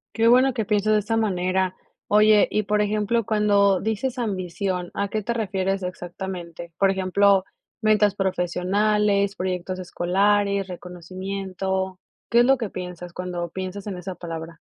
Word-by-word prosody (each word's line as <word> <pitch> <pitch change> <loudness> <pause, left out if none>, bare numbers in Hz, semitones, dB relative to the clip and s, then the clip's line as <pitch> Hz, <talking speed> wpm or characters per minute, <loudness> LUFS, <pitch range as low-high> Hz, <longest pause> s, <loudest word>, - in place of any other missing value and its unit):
Qué 225 0 +3
bueno 255 +2 +5
que 220 -3 -1
piensas 215 0 +2
de 210 - +4
esta 225 +2 -1
manera, 185 -3 0 0.3
oye, 210 0 +5
y, 215 - 0
por 210 +1 +1
ejemplo, 210 +2 0
cuando 200 -2 +3
dices 220 +4 -2
ambición, 185 -4 -2
¿a 200 0 0
qué 215 0 -2
te 235 +3 -2
refieres 195 -3 -1
exactamente?, 175 -2 -6
por 195 -1 +4
ejemplo, 195 +1 +3 0.4
¿ventas 210 -2 +3
profesionales, 200 +2 +1
proyectos 185 0 -3
escolares, 200 +2 +1
reconocimiento? 185 +1 -4 0.3
¿Qué 235 - +5
es 240 - +6
lo 270 +1 +4
que 225 -4 -3
piensas 180 -1 -7
cuando 175 -2 -4
piensas 190 +2 -6
en 200 -3 -5
esa 185 0 -6
palabra? 165 -1 -7
195 Hz, 145 wpm, -24 LUFS, 180-210 Hz, 0.4 s, es